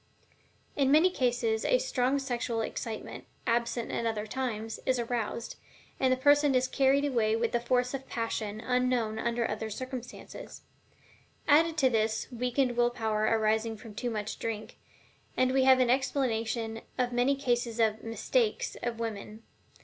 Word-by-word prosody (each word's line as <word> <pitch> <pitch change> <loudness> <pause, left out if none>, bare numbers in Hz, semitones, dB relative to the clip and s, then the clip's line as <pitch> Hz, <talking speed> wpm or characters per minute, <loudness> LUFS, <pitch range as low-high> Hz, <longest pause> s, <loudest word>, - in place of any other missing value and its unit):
In 275 -2 +2
many 320 +5 +6
cases 240 -6 0
a - - +3
strong 275 - 0
sexual 240 -4 -2
excitement, 225 0 -5 0.2
absent 235 0 0
at 230 - -1
other 215 -2 -2
times, 225 -2 -4
is 260 -1 +1
aroused, 235 -1 -3 0.4
and 260 -1 +3
the 255 - +3
person 290 +1 +4
is 255 0 +3
carried 275 +1 +3
away 225 -6 +1
with 230 0 0
the 240 - +1
force 250 +1 0
of 270 -1 -6
passion 220 -2 -3
unknown 250 -3 0
under 235 0 0
other 220 +1 -4
circumstances. 255 +2 -8 0.8
Added 320 +2 +4
to 270 -4 +4
this 220 -1 +1
the 245 - -8
weakened 250 +1 0
will 240 0 +4
power 220 -3 -1
arising 220 0 +1
from 220 -1 -11
too 245 +4 -3
much 215 -1 -4
drink, 220 0 -5 0.6
and 255 0 +3
we 265 0 +3
have 260 -1 +7
an 250 -1 +3
explanation 230 -4 -1 0.2
of 250 -1 0
many 250 +3 +2
cases 240 -4 -1
of 220 -1 +2
"mistakes" 425 - 0
of 235 -1 -3
women. 220 -1 -5
240 Hz, 155 wpm, -29 LUFS, 225-260 Hz, 0.8 s, have